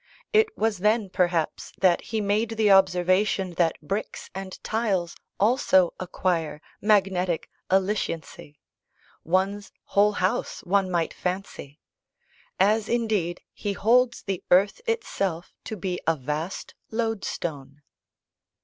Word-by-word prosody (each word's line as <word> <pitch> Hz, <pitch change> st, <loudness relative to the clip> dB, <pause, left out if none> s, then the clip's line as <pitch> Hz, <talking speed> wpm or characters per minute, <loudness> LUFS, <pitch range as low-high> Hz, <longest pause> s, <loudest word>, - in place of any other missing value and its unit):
It 435 Hz, 0 st, +5 dB
was 220 Hz, -3 st, 0 dB
then, 210 Hz, 0 st, +1 dB
perhaps, 175 Hz, -3 st, 0 dB
that 185 Hz, -3 st, +4 dB
he 220 Hz, -1 st, -1 dB
made 210 Hz, +3 st, +1 dB
the 215 Hz, -2 st, +4 dB
observation 190 Hz, 0 st, +3 dB
that 165 Hz, -2 st, +2 dB
bricks 195 Hz, +7 st, -4 dB
and 190 Hz, 0 st, -6 dB
tiles 200 Hz, -6 st, -1 dB, 0.2 s
also 200 Hz, -5 st, +3 dB
acquire 175 Hz, -4 st, -1 dB, 0.2 s
"magnetic 190 Hz, -4 st, +1 dB, 0.2 s
alliciency" 185 Hz, -6 st, -1 dB, 0.7 s
one's 190 Hz, +3 st, 0 dB, 0.2 s
whole 205 Hz, +1 st, +4 dB
house, 185 Hz, 0 st, -1 dB
one 195 Hz, +1 st, +1 dB
might 170 Hz, -2 st, 0 dB
fancy; 180 Hz, -5 st, -5 dB, 0.8 s
as 210 Hz, +3 st, +3 dB
indeed, 215 Hz, -7 st, 0 dB
he 205 Hz, -2 st, -3 dB
holds 240 Hz, +5 st, +2 dB
the 195 Hz, -3 st, -3 dB
earth 195 Hz, -, +4 dB
itself 195 Hz, -, -2 dB
to 220 Hz, -, -5 dB
be 180 Hz, -1 st, -3 dB
a 165 Hz, -, +4 dB
vast 150 Hz, +6 st, -4 dB, 0.2 s
lodestone. 170 Hz, -, -3 dB
190 Hz, 115 wpm, -25 LUFS, 175-210 Hz, 0.8 s, It